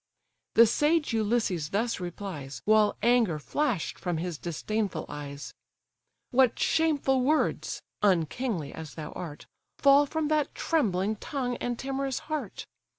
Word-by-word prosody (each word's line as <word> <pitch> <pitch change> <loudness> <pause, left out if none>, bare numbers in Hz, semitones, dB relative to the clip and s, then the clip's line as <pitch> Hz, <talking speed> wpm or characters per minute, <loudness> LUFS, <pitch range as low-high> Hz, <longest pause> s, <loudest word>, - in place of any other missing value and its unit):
The 230 - +9
sage 295 +4 +2
Ulysses 215 -8 0
thus 225 +4 -1
replies, 175 -8 -6
While 215 -1 +4
anger 230 -8 +3
flash'd 235 - -1
from 175 -3 -2
his 170 -1 -4
disdainful 205 +5 -2
eyes: 145 -1 -7 0.8
"What 255 -1 +4
shameful 285 -5 +2
words 300 +5 0 0.2
(unkingly 185 - 0
as 160 -3 -8
thou 155 -1 -6
art) 155 -5 -7 0.3
Fall 280 +1 +6
from 315 +1 -1
that 305 -2 +1
trembling 215 - 0
tongue 250 +1 -3
and 240 -1 -3
timorous 270 0 -2 0.2
heart? 275 -10 -4
220 Hz, 125 wpm, -28 LUFS, 175-270 Hz, 0.8 s, The